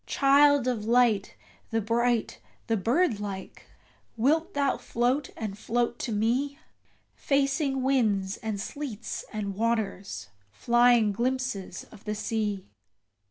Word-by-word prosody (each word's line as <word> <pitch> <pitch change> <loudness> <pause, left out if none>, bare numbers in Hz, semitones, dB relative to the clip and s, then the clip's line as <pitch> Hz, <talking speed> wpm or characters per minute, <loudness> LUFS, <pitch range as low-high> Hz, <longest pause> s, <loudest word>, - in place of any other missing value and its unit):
Child 280 -1 +4
of 240 -4 -1
Light, 230 -4 +3 0.3
the 225 - 0
bright, 235 +1 0 0.3
the 225 - +1
bird 235 - +1
like! 200 -2 -7 0.5
wilt 315 - +1
thou 280 -1 +1
float 250 +4 0
and 210 -3 -4
float 240 +3 -1
to 240 - -3
me 245 +7 0 0.6
Facing 275 -1 0
winds 215 -7 +1
and 220 -3 -4
sleets 245 -1 -5
and 205 -2 -3
waters, 205 - -2 0.2
flying 240 - +4
glimpses 240 -4 -2
of 215 - -15
the 210 0 -2
sea? 210 -3 -2
235 Hz, 115 wpm, -27 LUFS, 210-265 Hz, 0.6 s, Child